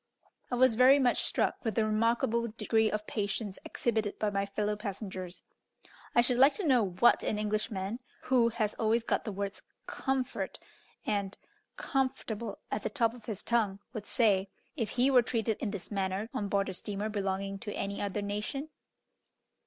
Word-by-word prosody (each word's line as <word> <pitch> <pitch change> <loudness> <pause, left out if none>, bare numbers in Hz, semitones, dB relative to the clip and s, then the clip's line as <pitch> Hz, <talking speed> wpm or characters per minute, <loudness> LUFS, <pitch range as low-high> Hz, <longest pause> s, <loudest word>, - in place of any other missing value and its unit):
I 245 - 0
was 255 -1 +5
very 255 +4 +7
much 255 -3 +2
struck - - 0
with 225 -4 -1
the 225 - +3
remarkable 230 +1 +1
degree 220 0 +1
of 210 0 -2
patience 210 -2 -2
exhibited 220 -3 -1
by 210 -1 0
my 200 0 0
fellow 210 +1 -1
passengers. 190 -3 -6 0.7
I 240 - +7
should 245 0 +1
like 275 +3 +7
to 405 - -2
know 255 -6 +5
what 190 +5 +4
an 215 - -1
Englishman, 210 0 -2 0.2
who 245 -3 +4
has 215 -2 -1
always 225 +1 +2
got - - 0
the 215 - -2
words 200 0 -4 0.2
"comfort" 265 -1 -2 0.5
and 200 -2 -1 0.4
"comfortable" 250 -6 -2
at 205 - -1
the - - -2
top 230 -5 +1
of 240 -3 -13
his 215 -3 -5
tongue, 220 -5 +1 0.2
would 215 -4 -6
say, 200 -6 +3 0.3
if 230 -7 -1
he 255 +2 +2
were 255 -2 +7
treated 225 -2 -1
in 220 - -2
this 200 -1 -6
manner 195 +1 -1
on 205 - -2
board 200 0 +1
a - - -3
steamer 205 +2 -3
belonging 195 -1 -2
to 210 -2 -5
any 200 0 -3
other 205 0 -2
nation? 210 +9 -3
215 Hz, 175 wpm, -31 LUFS, 200-235 Hz, 0.7 s, very